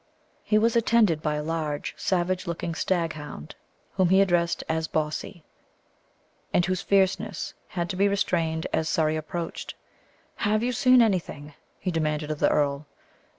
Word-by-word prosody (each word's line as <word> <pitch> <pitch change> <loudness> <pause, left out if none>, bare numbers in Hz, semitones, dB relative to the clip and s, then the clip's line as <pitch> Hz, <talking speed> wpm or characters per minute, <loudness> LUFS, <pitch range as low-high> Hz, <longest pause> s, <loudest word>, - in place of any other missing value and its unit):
He 215 - +2
was 230 +2 +2
attended 225 -8 +3
by 150 -1 -1
a 150 - -3
large 155 -2 -3
savage 185 0 -1
looking 170 0 -3
staghound, 155 - -3 0.4
whom 185 -2 +3
he 190 +1 +5
addressed 175 -3 +2
as 160 0 -1
Bawsey, 155 +2 -3 1.1
and 175 - +3
whose 185 0 -1
fierceness 195 -1 0
had 175 -1 -3
to - - -5
be 200 +2 +3
restrained 165 -5 0
as 160 0 0
Surrey 155 -1 +1
approached. 165 +2 -5 0.6
"Have 215 +1 +1
you 250 - +1
seen 255 0 +5
anything?" 165 -8 -2 0.3
he 185 - -2
demanded 155 -2 -1
of 150 - -4
the - - +4
earl. 145 0 0
170 Hz, 150 wpm, -26 LUFS, 155-195 Hz, 1.1 s, he